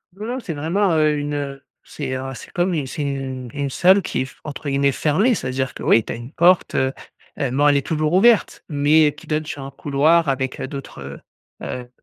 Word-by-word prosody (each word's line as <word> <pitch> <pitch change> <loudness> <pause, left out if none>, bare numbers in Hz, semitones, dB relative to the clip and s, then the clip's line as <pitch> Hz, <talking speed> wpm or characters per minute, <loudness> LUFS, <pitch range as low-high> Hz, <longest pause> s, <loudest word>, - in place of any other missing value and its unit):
Non, 210 +2 -7
non, 245 +3 -3
c'est 180 -9 -5
vraiment, 170 +7 0
heu, 155 -1 +3
une, 145 0 -3
heu, 140 -1 -4 0.2
c'est, 135 -3 -5
heu, 135 +1 -4
c'est - - -11
comme 175 +1 0
une 150 -5 -2
c'est 150 - -5
une 135 -3 -4
une 140 -1 -2
salle 185 +8 +4
qui - - -2
est - - -1
f 135 - -15
entre 145 -1 -5
guillemets 140 0 +2
«fermée». 190 - +2
C'est-à-dire 130 -4 -3
que, - - -9
oui, 115 - +4
tu - - -5
as - - -5
une 120 +3 -9
porte, 175 +2 +3
heu 130 0 +1 0.5
heu, 135 -3 0
bon, 145 +3 +3
elle 145 -1 +5
est 140 - -2
toujours 155 0 0
ouverte 220 +3 +4
mais 150 0 +4
qui 150 - -15
donne 155 0 -1
sur 145 -2 -6
un 135 - -6
couloir 150 +4 +2
avec, 130 -1 -2
heu, - - -3
d'autres, 135 - -8
heu 70 +1 -8 0.4
heu, 125 -1 -6
145 Hz, 235 wpm, -21 LUFS, 135-160 Hz, 0.5 s, elle